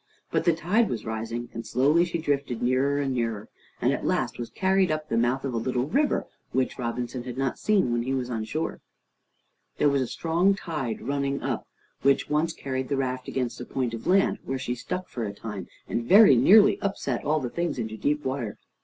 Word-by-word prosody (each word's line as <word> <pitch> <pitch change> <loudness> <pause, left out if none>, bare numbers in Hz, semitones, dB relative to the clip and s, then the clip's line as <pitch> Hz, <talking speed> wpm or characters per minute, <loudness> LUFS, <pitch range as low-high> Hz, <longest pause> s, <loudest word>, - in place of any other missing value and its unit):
But - - 0
the 170 - +5
tide 190 +8 +2
was 110 -3 -4
rising, 115 +2 -4
and 115 - -5
slowly 145 +9 +3
she 170 -1 -2
drifted 140 -7 -1
nearer 130 +3 +2
and 135 -2 0
nearer, 115 -4 -2 0.3
and - - +2
at - - -3
last - - -1
was 120 -1 -4
carried 190 +6 +2
up 155 0 -2
the - - 0
mouth 120 +4 +1
of 135 - -2
a - - -1
little 125 +2 0
river 285 - +1 0.3
which 130 +1 0
Robinson 120 +1 -3
had 125 0 -7
not 135 -1 -1
seen 200 - +2
when 120 0 +1
he 130 +3 -2
was 125 -2 -2
on 115 -3 -3
shore. 155 +8 -3 1.0
There 145 - +4
was 140 -1 +2
a 130 - -1
strong 170 +8 +2
tide 150 - -4
running 140 0 -1
up, - - -2 0.3
which 140 +1 +2
once 155 +2 +2
carried 130 -4 -4
the 140 - 0
raft 130 -1 -2
against 125 -2 -3
a - - -3
point 125 -3 -2
of 115 - -6
land, 195 +1 +3
where 135 - -3
she 130 -2 -3
stuck 180 +9 -4
for 120 - -5
a 100 -2 -3
time, 105 -5 -6 0.2
and 120 - -1
very 195 - +8
nearly 200 - +6
upset 140 -11 -2
all 155 +1 +2
the 125 -4 -4
things 170 -3 -2
into 110 -2 -3
deep 150 +6 -1
water. 130 -5 -3
130 Hz, 215 wpm, -26 LUFS, 120-155 Hz, 1.0 s, very